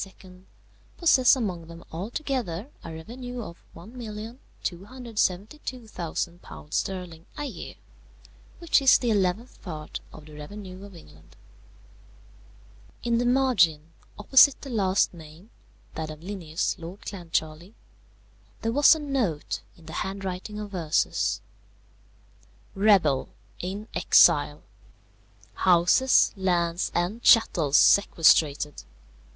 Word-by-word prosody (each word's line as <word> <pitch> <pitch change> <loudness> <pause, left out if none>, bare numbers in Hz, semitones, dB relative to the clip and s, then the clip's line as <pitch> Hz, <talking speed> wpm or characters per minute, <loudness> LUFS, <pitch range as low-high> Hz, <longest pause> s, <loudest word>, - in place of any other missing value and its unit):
possess 270 -7 +5
among 185 -10 -4
them 170 0 -11
altogether 230 - -4
a 165 - -8
revenue 245 +10 -8
of 170 - -11
£1,272,000 215 - -5
sterling 180 -4 -4
a - - -3
year, 275 - -8 0.8
which 335 -4 +2
is 270 - +7
the 240 -2 -1
eleventh 200 +3 -1
part 155 -5 -7
of 155 - -13
the 155 - -14
revenue 185 +5 -9
of 200 -2 -12
England." 80 - -17 1.7
In 235 0 +1
the 245 - 0
margin, 180 - +2 0.3
opposite 265 +6 +5
the 275 - -8
last 195 -5 +1
name 165 +5 -14 0.4
(that 160 -1 -5
of 155 0 -9
Linnæus, 180 -2 -3
Lord 170 +4 -9
Clancharlie), 170 0 -4 0.9
there 225 - 0
was 290 +5 +6
a - - -5
note 255 - -2 0.2
in 165 - -18
the 160 - -10
handwriting 195 +3 -5
of 205 -1 -7
Ursus: 165 -4 0 1.3
_Rebel; 195 -10 +3 0.3
in 200 +4 -5
exile; - - +4 0.9
houses, 185 +9 +4
lands, 175 -2 0
and 180 +7 -1
chattels 165 - +4
sequestrated. 155 -6 +4
190 Hz, 100 wpm, -26 LUFS, 165-230 Hz, 1.7 s, is